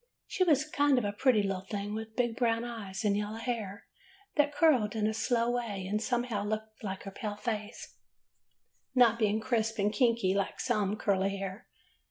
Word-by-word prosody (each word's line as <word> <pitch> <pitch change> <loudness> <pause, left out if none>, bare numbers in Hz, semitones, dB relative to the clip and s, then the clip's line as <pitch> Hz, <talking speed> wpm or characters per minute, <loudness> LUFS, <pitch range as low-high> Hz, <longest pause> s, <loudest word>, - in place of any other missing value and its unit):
"She 375 - 0
was 300 -4 +3
a - - -18
kind 285 -2 +3
of 205 -4 -1
pretty 250 -6 +4
little 195 -2 -1
thing, 200 +1 -4
with 220 0 -6
big 240 -2 0
brown 230 -1 +1
eyes 220 -3 -5
and 200 -1 +3
yellow 210 +1 -2
hair 225 -4 -4 0.5
that 295 -1 +3
curled 265 -10 +3
in 215 -1 0
a 220 - +1
slow 230 +1 +1
way 225 -6 -3
and 210 +2 -1
somehow 235 -3 -1
looked 215 +1 -4
like 190 -2 -4
her 195 - -7
pale 205 +1 -4
face, 215 0 -5 1.0
not 235 -2 +5
being 215 -1 +2
crisp 225 -1 0
and 205 +1 +1
kinky 230 -4 +2
like 200 -1 -1
some 210 -5 0
curly 195 -1 +1
hair. 195 +3 -6
220 Hz, 185 wpm, -31 LUFS, 205-240 Hz, 1.0 s, not